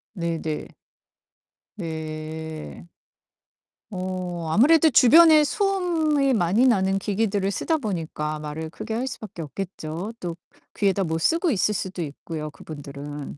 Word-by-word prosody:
네네. 165 -3 -3 1.1
네. 160 -1 -6 1.1
어 185 -2 -4
아무래도 315 - +6
주변에 310 +5 +7
소음이 325 -7 +1
많이 210 +4 +3
나는 195 -4 +3
기기들을 200 -1 0
쓰다 320 +10 0
보니까 160 - -3
말을 155 +1 -5
크게 220 +7 -6
할 245 +4 -1
수밖에 215 -8 -7
없겠죠. 175 +3 -5
또 170 -2 -4 0.4
귀에다 195 -1 +1
뭐 160 -1 -1
쓰고 330 - +2
있을 210 -1 +1
수도 190 -2 -4
있고요, 155 0 -5
그분들은. 145 -1 -8
185 Hz, 250 characters per minute, -24 LUFS, 160-235 Hz, 1.1 s, 주변에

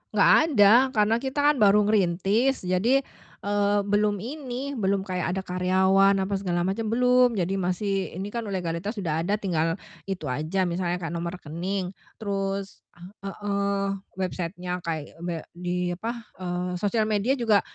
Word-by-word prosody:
Nggak - - +6 0.2
ada, 220 +6 +7
karena 210 +1 +3
kita 265 +2 -3
kan - - -2
baru 210 0 +6
ngerintis 205 +5 +2
jadi, 225 +10 +2 0.4
eee, 205 0 +2
belum 205 0 +1
ini, 270 0 -5
belum 195 -1 +1
kayak 180 -1 -2
ada 190 - -1
karyawan 190 +2 +3
apa 200 +1 -3
segala 175 -3 -1
macem, 200 +4 -1
belum. 250 +1 +4
Jadi 190 +1 -1
masih 190 0 -1
ini 195 +3 -5
kan 235 -2 -4
legalitas 185 +2 -3
udah 165 -6 -1
ada 200 +5 +1
tinggal 165 -5 0 0.3
itu 190 -4 -4
aja 160 +8 -1
misalnya 175 0 -1
kayak 175 -2 -5
nomor 170 +1 -3
rekening, 180 +4 -4 0.2
terus 195 -2 -3 0.2
ah 195 +3 -9
heeh, 200 0 -1 0.3
website-nya, 180 -1 -3
kayak 165 -1 -5
be 175 -1 -3 0.2
di 180 0 -2
apa, 230 +6 -4 0.2
eee, 180 0 -2
sosial 215 +1 +1
media 215 +6 +1
juga 220 -4 +3
195 Hz, 150 wpm, -26 LUFS, 180-210 Hz, 0.4 s, ada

